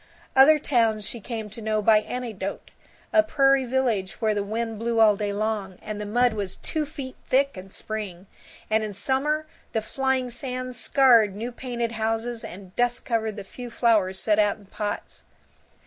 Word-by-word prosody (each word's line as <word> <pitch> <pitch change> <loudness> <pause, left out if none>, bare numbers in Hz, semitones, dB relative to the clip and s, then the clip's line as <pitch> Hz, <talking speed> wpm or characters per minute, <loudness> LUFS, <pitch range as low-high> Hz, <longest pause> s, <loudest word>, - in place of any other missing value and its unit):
Other 280 +4 +8
towns 230 -7 +1
she 235 - -5
came 220 0 -5
to 225 - -8
know 215 0 0
by 215 +1 +5
anecdote: 215 -4 -5 0.4
a 325 - +7
prairie 275 -4 +3
village 235 -7 -1
where 220 -2 +2
the 205 -1 -1
wind 225 +1 -3
blew 230 0 0
all 215 -2 +6
day 205 0 -2
long, 205 -2 -2
and 215 -1 -6
the 210 - -4
mud 245 +2 +3
was 200 -3 -3
two 310 -2 -2
feet 275 -4 -7
thick 275 0 +2
in 190 +1 -9
spring, 195 -3 -6 0.4
and 220 0 +2
in 210 -2 -5
summer 275 +8 0 0.3
the 220 - +1
flying 265 0 -1
sand 255 0 -4
scarred 235 -9 +4
new 230 +4 -4
painted 240 -2 -3
houses 225 +1 -2
and 185 0 -10
dust 245 0 0
covered 220 -3 -1
the 205 - -6
few 245 +5 -9
flowers 215 -6 +2
set 215 -1 +2
out 205 0 +3
in 205 - -18
pots. 205 +1 -5
225 Hz, 180 wpm, -25 LUFS, 210-250 Hz, 0.4 s, Other